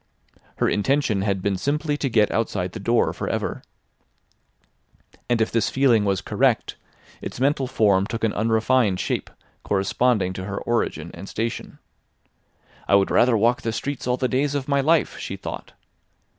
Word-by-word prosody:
Her - - +1
intention 110 -2 +1
had 100 -2 -1
been 100 -2 0
simply 150 - -1
to 140 - -1
get 110 -3 +3
outside 95 -5 -1
the - - -7
door 120 0 +1
for - - -4
ever. - - -3 1.7
And 120 -1 +2
if 110 - +1
this 115 -2 +1
feeling 125 -6 +3
was 100 -2 0
correct, - - +1 0.5
its - - -6
mental 135 0 +1
form 100 -5 +2
took 115 +1 -5
an 110 - +1
unrefined 110 -2 +2
shape - - -2 0.3
corresponding 100 0 +1
to 95 0 -6
her 100 0 -4
origin 85 -8 -1
and 95 +3 -9
station. 115 +1 -4 1.1
"I - - +5
would 100 -1 +3
rather 120 -1 +4
walk 120 +3 +2
the 115 - -2
streets 140 +4 -4
all 125 0 +1
the 130 - 0
days 140 +3 0
of 135 -2 -2
my 140 -1 +2
life," 160 +2 +2
she - - -5
thought. - - -8
115 Hz, 165 wpm, -23 LUFS, 100-130 Hz, 1.7 s, I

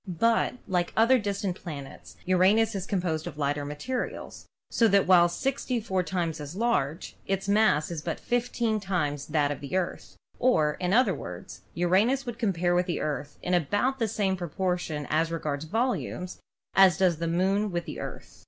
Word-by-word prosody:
But, 225 +8 +1
like 180 -3 +1
the - - +1
other 250 +3 +5
distant 200 -3 -2
planets, 145 -6 -9
Uranus 195 +5 +3
is 195 -2 -4
composed 175 -5 -1
of 155 -4 -7
lighter 145 0 -1
materials, 150 - -5 0.2
so 230 - +4
that 200 -2 +4
while 175 -2 +6
64 230 -2 -1
times 170 -4 -2
as 145 +3 -7
large 185 - -1
its 195 +1 -1
mass 200 -7 +3
is 165 -3 -4
but 165 +1 -4
15 240 -2 0
times 160 -8 -2
that 150 -2 +1
of 145 - -4
the 140 +4 -5
Earth, 180 -2 -4 0.2
or, 155 -12 +3
in 180 0 -1
other 225 -2 +4
words, 90 - -8
Uranus 200 - +2
would 235 -2 -6
compare 180 -6 +1
with 180 +1 +2
the 175 - -1
Earth 145 -1 -4
in 180 - -1
about 205 - +1
the 225 - +1
same 200 -3 0
proportion 175 -3 -2
as 160 +2 +1
regards 155 -2 -3
volumes 220 -3 -2 0.3
as 190 -3 +6
does 180 -4 +3
the 170 +1 -2
Moon 190 +5 +1
with 175 -1 -2
the - - -7
Earth. - - -8
180 Hz, 175 wpm, -27 LUFS, 160-210 Hz, 0.3 s, while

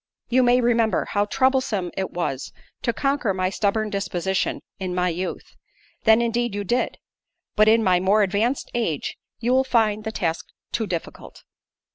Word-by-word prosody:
You 255 +2 +4
may 245 0 +4
remember, 230 -2 +2
how 205 0 0
troublesome 260 -6 +1
it 190 -1 -2
was, 140 -7 -3 0.3
to 235 - +1
conquer 275 -6 0
my 185 0 0
stubborn 215 +1 0
disposition 190 -1 -1 0.2
in 185 -2 -3
my 180 0 +1
youth; 180 +2 -5 0.5
then, 220 +1 +6
indeed, 235 -2 -1
you 205 - -2
did; 240 +6 -1 0.6
but 215 0 +5
in 225 +1 +5
my 180 -3 +4
more 200 +3 +3
advanced 210 +7 0
age, 215 - -2 0.3
you 245 +2 +1
will 260 0 +4
find 220 -5 +1
the 220 - -3
task 165 -6 -2 0.2
too 220 - -1
difficult." 170 -3 -6
215 Hz, 160 wpm, -23 LUFS, 185-235 Hz, 0.6 s, then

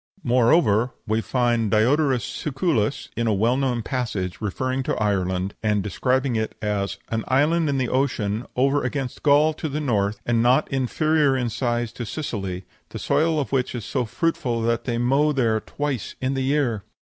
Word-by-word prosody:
Moreover, 120 -2 +3
we 110 +1 0
find 120 -3 +1
Diodorus 130 +4 +2
Siculus, 140 - -1
in 115 -1 -1
a 110 - +2
well 115 +5 +2
known 130 -4 0
passage, 105 -8 -3
referring 130 +6 -2
to - - -1
Ireland, 95 -2 -1
and 105 -2 +1
describing 130 +5 0
it 110 0 -2
as 105 -2 -2
"an 110 -1 -1
island 150 +4 +2
in 140 - 0
the 130 -2 0
ocean 120 -4 -1
over 135 +3 +2
against 130 0 -3
Gaul, 150 +2 +4
to 155 0 -4
the 145 +2 -3
north, 105 -7 0
and 115 -1 +2
not 125 +5 +3
inferior 140 +2 +2
in 120 -2 -1
size 120 -1 -1
to 120 - -5
Sicily, 95 - -4 0.2
the - - -7
soil 160 0 +1
of 140 - -3
which 130 -2 0
is 115 - -5
so 125 -3 -1
fruitful 130 -2 -1
that 115 0 0
they 120 -2 -1
mow 135 +5 +2
there 115 -5 +1
twice 140 +1 -4
in 130 +1 -1
the 135 - -1
year." 130 -6 0
125 Hz, 175 wpm, -23 LUFS, 110-140 Hz, 0.2 s, Gaul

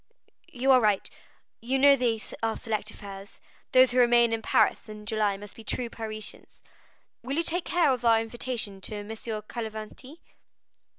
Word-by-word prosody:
"You 265 +2 +2
are 255 -1 +6
right; 210 -3 +2 0.5
You 255 +4 0
know 280 +1 +7
they 240 -4 0 0.2
are 225 -1 -1
select 215 -1 -3
affairs; 200 -1 -10 0.3
those 255 0 +6
who 250 - +2
remain 240 -1 +5
in 225 - -1
Paris 215 - +2
in 210 0 -9
July 210 -2 0
must 205 0 -11
be 225 - -12
true 235 +1 -3
Parisians. 215 -1 -7 0.6
Will 270 +5 -3
you 335 - +2
take 345 +1 -2
charge 335 -6 +3
of 240 - -8
our 225 -1 +5
invitation 225 -3 -4
to 205 +1 -5
Messieurs 220 0 -6
Cavalcanti?" 230 +6 -7
225 Hz, 165 wpm, -27 LUFS, 215-255 Hz, 0.6 s, know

